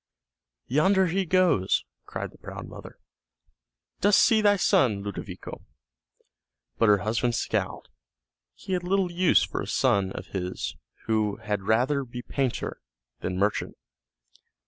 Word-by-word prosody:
"Yonder 190 +9 +3
he 185 +2 0
goes," 175 - +2 0.2
cried - - -5
the - - -19
proud - - -8
mother; - - -11 1.0
"dost 205 0 +5
see 225 -3 +5
thy 205 -1 +5
son, 130 - +2
Ludovico?" 100 0 -7 1.2
But 115 - +4
her 105 - +6
husband 115 +2 0
scowled; - - -2 0.7
he 190 - -6
had 180 - 0
little 185 0 0
use 180 +1 +4
for - - -3
a - - -5
son 95 -1 +2
of - - -7
his 90 -1 -3 0.3
who 110 -2 +1
had 105 -1 -3
rather 130 +6 +2
be 120 -1 -8
painter 135 -4 -2 0.4
than 90 0 -3
merchant. 100 +2 -1
130 Hz, 130 wpm, -26 LUFS, -, 1.2 s, her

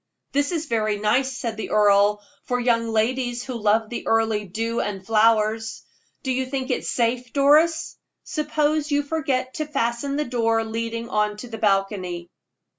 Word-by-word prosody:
"That 285 +2 +1
is 330 -2 -2
very 215 -5 0
nice," 250 +5 +1
said 225 -2 -4
the 220 - -5
earl, 205 0 +4 0.2
"for 250 0 -1
young 235 -1 +2
ladies 240 +2 0
who 260 - -6
love 220 0 +1
the 240 - -5
early 220 -2 +1
dew 225 +5 -2
and 205 -2 -2
the 190 - -21
flowers. 220 0 +2 0.4
Do 265 - -1
you 260 0 -1
think 265 0 -3
it - - -2
safe, 240 0 0
Doris? 300 +4 +3 0.3
Suppose 305 0 0
you 290 0 +2
forgot 275 -4 -1
to 310 - -3
fasten 275 -1 -1
the 300 +1 0
door 230 -2 +1
leading 230 +1 -4
on 210 0 0
to 245 - -8
the 225 -2 -7
balcony?" 195 -4 0
230 Hz, 170 wpm, -23 LUFS, 215-265 Hz, 0.4 s, earl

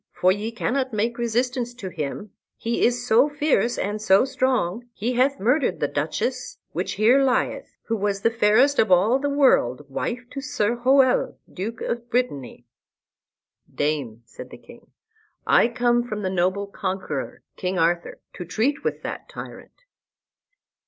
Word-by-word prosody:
For 185 - +3
ye 210 +4 -2
cannot 255 +2 -2
make 230 +3 -1
resistance 240 +1 -1
to 200 -6 -6
him, 170 +5 -5 0.3
he 230 +1 -1
is 245 0 +1
so 250 +5 +4
fierce 290 -4 +1
and 210 +2 -2
so 200 +2 +4
strong. 250 -5 -1
He 230 +4 -2
hath 265 +3 +2
murdered 255 +8 +1
the - - +1
Duchess, 255 0 -3
which - - -3
here 240 +6 +4
lieth, 260 -2 -1
who 230 - -2
was 200 -1 -1
the 230 - +2
fairest 235 +6 +3
of 220 - +3
all 205 +9 +4
the 285 +1 -1
world, 150 - +2
wife 245 - -3
to 275 - -5
Sir 240 -5 -1
Hoel, 260 +1 +3 0.2
Duke 220 +5 -5
of 235 0 -4
Brittany." 145 - -2 1.1
"Dame," 140 -7 -2
said 115 - -11
the - - -11
king, - - -17 0.6
"I - - +5
come 240 0 +1
from 215 -3 -5
the 185 - -1
noble 185 +2 0
conqueror, 190 -7 -4
King 185 0 -3
Arthur, 170 +1 0 0.2
to - - -6
treat 225 - -1
with - - -3
that - - -6
tyrant." - - -11
230 Hz, 155 wpm, -23 LUFS, 190-250 Hz, 1.1 s, I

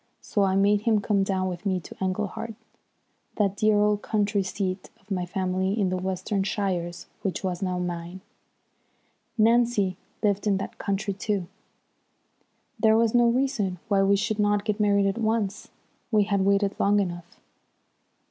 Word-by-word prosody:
So 205 - -1
I 190 -1 +2
made 200 +1 +3
him 220 -1 +2
come 205 -1 +1
down 190 -1 0
with 180 -1 -5
me 190 -3 0
to - - -11
Englehart, 210 +4 -3 0.8
that 200 -3 +1
dear 215 0 +3
old 210 0 +2
country 205 -1 0
seat 190 0 -3
of 200 +1 -22
my 180 -2 -1
family 190 +2 -1
in 195 -3 +2
the 185 - -1
Western 190 +2 -2
shires 185 -4 -2 0.2
which 195 -1 -3
was 180 -1 -2
now 185 -2 -1
mine. 175 +1 -4 1.2
Nancy 225 -4 +3 0.3
lived 205 0 +1
in 200 -2 +3
that 195 - -6
country, 200 +1 -1
too. 200 -1 -2 1.3
There 220 0 +5
was 230 -1 +2
no 240 -1 +5
reason 235 -7 0
why 200 -2 +3
we 195 +1 +4
should 215 +2 -1
not 205 0 +2
get 210 -1 -1
married 200 -1 +3
at 195 +3 0
once. 220 -3 -1 0.4
We 215 -3 +4
had 200 -1 0
waited 200 +1 +2
long 205 +1 +3
enough. 175 -3 -4
200 Hz, 160 wpm, -26 LUFS, 190-210 Hz, 1.3 s, There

